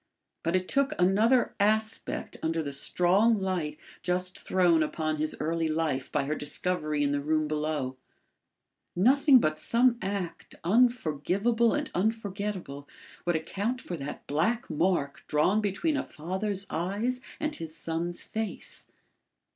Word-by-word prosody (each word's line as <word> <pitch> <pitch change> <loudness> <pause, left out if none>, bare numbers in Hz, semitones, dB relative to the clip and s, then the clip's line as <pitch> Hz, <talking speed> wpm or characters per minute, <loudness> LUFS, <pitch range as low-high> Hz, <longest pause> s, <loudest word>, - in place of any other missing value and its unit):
But 165 +2 0
it 185 0 0
took 275 -1 +1
another 215 +7 +3
aspect 215 +2 +1
under 160 0 0
the 140 -1 -4
strong 190 +10 +3
light 175 -6 -2 0.2
just 180 +1 -1
thrown 175 -3 +3
upon 155 0 -1
his 155 0 -1
early 165 +1 0
life 155 -4 -1
by 150 - +1
her 145 +2 -1
discovery 155 0 0
in 140 - +1
the 145 0 0
room 155 +1 +1
below. 150 -4 -2 1.0
Nothing 265 - +6
but 155 -9 +1
some 240 +4 +3
act, 195 -3 -4
unforgivable 225 - +2
and 295 -1 -2
unforgettable 200 -8 -2 0.4
would 175 -1 +1
account 200 +10 -2
for 180 - -5
that 140 -3 -7
black 175 +12 0
mark 155 -3 0
drawn 180 +8 +2
between 215 - 0
a - - 0
father's 190 +5 -3
eyes 205 +10 -1 0.2
and 305 0 -2
his 165 0 -7
son's 165 +2 -3
face. 220 -1 -6
180 Hz, 135 wpm, -28 LUFS, 155-215 Hz, 1.0 s, Nothing